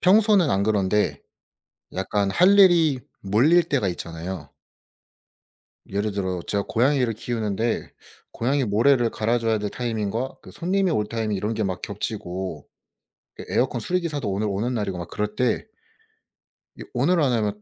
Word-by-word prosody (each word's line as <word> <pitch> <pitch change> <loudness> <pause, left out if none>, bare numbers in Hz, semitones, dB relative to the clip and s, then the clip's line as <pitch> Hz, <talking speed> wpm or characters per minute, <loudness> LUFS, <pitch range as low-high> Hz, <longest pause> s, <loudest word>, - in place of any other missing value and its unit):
평소는 200 -2 +5
안 95 +1 +2
그런데 105 0 +1 0.7
약간 100 +1 0
할 185 - +5
일이 165 -8 +5 0.2
몰릴 130 - +4
때가 140 -10 0
있잖아요. 85 -2 -5 1.4
예를 100 +2 -1
들어 95 -3 -2
제가 100 -1 0
고양이를 125 0 +2
키우는데 110 0 -2 0.4
고양이 135 +4 0
모래를 120 +3 +3
갈아 115 +2 0
줘야 115 -1 +1
될 105 -1 -3
타이밍과 115 +1 -3
그 - - -13
손님이 185 +1 0
올 105 -9 +1
타이밍 110 -2 -2
이런 105 +4 -2
게 110 0 -1
막 95 -2 -3
겹치고 95 -6 -5 0.7
에 - - -6
에어컨 125 -1 0
수리 180 +11 0
기사도 145 - -3
오늘 100 +3 -1
오는 105 +6 -1
날이고 100 -5 -2
막 85 - -6
그럴 105 0 -3
때 125 +1 0 1.1
이 - - -7
오늘 180 -2 +2
안 140 -4 +3
하면 105 -3 -1
110 Hz, 305 characters per minute, -24 LUFS, 100-135 Hz, 1.4 s, 평소는